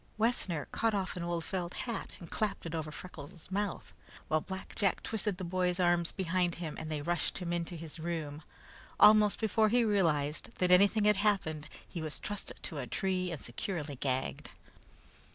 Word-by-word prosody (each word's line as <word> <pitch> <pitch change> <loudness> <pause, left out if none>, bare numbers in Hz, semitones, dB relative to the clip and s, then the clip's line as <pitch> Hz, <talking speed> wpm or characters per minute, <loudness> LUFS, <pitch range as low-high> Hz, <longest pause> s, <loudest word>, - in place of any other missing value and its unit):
Wessner 205 - +1
caught 225 -2 +1
off 190 -2 -1
an 180 - -4
old 170 -1 -1
felt 175 -1 -3
hat 235 -4 -3
and 170 - -11
clapped 210 -4 -1
it 165 - -4
over 160 -2 -2
Freckles' 165 +2 -10
mouth, 200 -1 -2 0.4
while 155 0 +3
Black 190 +2 -7
Jack 195 -4 +1
twisted 210 -3 -1
the 185 - -5
boy's 180 0 0
arms 175 -2 +3
behind 180 -2 0
him 165 -3 -5
and 155 - -5
they 150 -2 -2
rushed 175 0 -1
him 175 -2 -2
into 175 0 -2
his 165 -1 -8
room. 160 -3 -3 0.6
Almost 210 -1 +7
before 220 0 +3
he 240 +1 +4
realized 165 -4 +1
that 180 -1 +2
anything 200 +3 +6
had 210 -1 +5
happened, 160 -8 +1 0.2
he 170 - -5
was 155 -1 -3
trussed 205 -1 -3
to - - -4
a - - -4
tree 185 -2 0
and 160 - -4
securely 150 +3 -3
gagged. 130 0 -1
180 Hz, 180 wpm, -32 LUFS, 160-200 Hz, 0.6 s, Almost